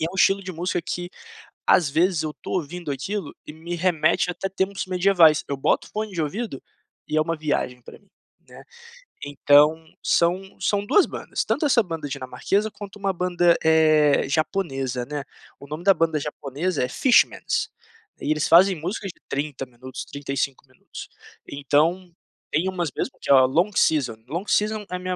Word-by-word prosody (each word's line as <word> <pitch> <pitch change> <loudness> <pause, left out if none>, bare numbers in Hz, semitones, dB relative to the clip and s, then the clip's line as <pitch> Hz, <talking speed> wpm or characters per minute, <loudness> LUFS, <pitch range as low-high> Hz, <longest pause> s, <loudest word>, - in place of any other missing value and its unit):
e 160 - 0
é - - -6
um - - -11
estilo 195 +1 +3
de 185 0 -6
música 175 +1 -2
que 175 +1 -4 0.6
às 165 -5 +4
vezes 170 +2 +1
eu 150 - -4
tô - - -7
ouvindo 170 -1 -4
aquilo 175 +6 -4
e 150 - -8
me 165 +3 -7
remete 170 -1 +1
até 195 +2 -4
tempos 195 +1 -2
medievais, 180 -4 +4
eu 140 - -2
boto 135 - +1
o - - -23
fone 215 -1 -4
de 170 - -3
ouvido 175 - -4 0.5
e 155 - -1
é - - +4
uma 165 +1 -2
viagem 145 -5 -2
pra - - -13
mim, 200 - -31 0.4
né. - - -14 0.6
Então, 145 +2 +4 0.2
são 185 +3 +1
são 205 0 0
2 405 - +4
bandas, - - -4
tanto 310 - -1
essa 255 -4 +4
banda 165 -4 -5
dinamarquesa, 140 +10 -2
quanto 205 -1 -10
uma 195 0 0
banda, 175 -1 +2
eh, 155 -3 +4
japonesa, 135 -6 -1
né, 145 0 -5 0.4
o 140 - -11
nome 155 +4 -6
da 195 - +6
banda 160 -2 +1
japonesa 145 +2 -3
é - - 0
Fishmans, 250 - +2 0.5
e 150 - -1
eles 155 -1 +1
fazem 185 +4 +6
músicas 180 +4 -5
de - - -30
30 140 -1 -3
minutos, 130 +1 -9
35 140 -1 -4
minutos, 130 - -11 0.4
então 155 +6 0 0.4
tem 165 +5 +1
umas 175 -4 -2
mesmo - - -4
que - - -8
é - - +9
a 130 -1 +7
Long 170 +10 +1
Season. 130 -8 +2
Long 170 +8 -4
Season 215 0 +1
é - - -2
a - - -4
minha 185 0 -3
165 Hz, 185 wpm, -23 LUFS, 145-185 Hz, 0.6 s, é